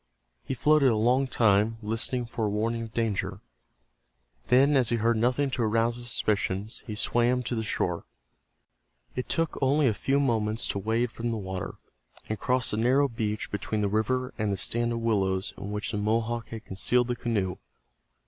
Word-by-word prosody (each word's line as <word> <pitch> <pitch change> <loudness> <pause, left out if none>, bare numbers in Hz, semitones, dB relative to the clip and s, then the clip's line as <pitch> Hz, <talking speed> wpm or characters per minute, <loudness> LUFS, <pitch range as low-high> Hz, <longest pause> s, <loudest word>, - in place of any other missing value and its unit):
He - - -3
floated 150 +1 +4
a 115 - +2
long 125 +5 +2
time, 110 -2 +3
listening 115 +3 0
for 115 -1 -3
a - - 0
warning 115 +3 -1
of 115 -1 -6
danger. 100 -4 -1 1.1
Then 140 +4 +5
as 125 -4 +3
he 120 - +2
heard 115 +1 +2
nothing 125 +4 +1
to 125 - -2
arouse 115 +1 +2
his 120 0 -5
suspicions 105 -2 -1
he 105 - -4
swam 120 +3 +1
to 120 - -3
the 115 - -1
shore. 110 - -2 1.1
It 125 - -4
took 165 -1 0
only 140 +2 +3
a 115 - +3
few 135 +6 +1
moments 110 -5 0
to 100 - -1
wade 115 +4 0
from 120 +1 -3
the 115 - -1
water, 95 -1 -5 0.5
and 110 - -3
cross 125 -1 +1
the 105 - -1
narrow 130 +5 +3
beach 110 -4 -3
between 105 +1 -2
the 100 - +2
river 125 +5 0
and 105 -1 0
the 100 - -1
stand 120 +5 +1
of 115 0 -2
willows 95 -4 0
in 100 - -7
which 105 0 -3
the 105 - -2
Mohawk 115 +2 0
had 110 -1 -8
concealed 120 +6 +1
the 125 - -1
canoe. 100 -7 -1
115 Hz, 185 wpm, -27 LUFS, 105-125 Hz, 1.1 s, Then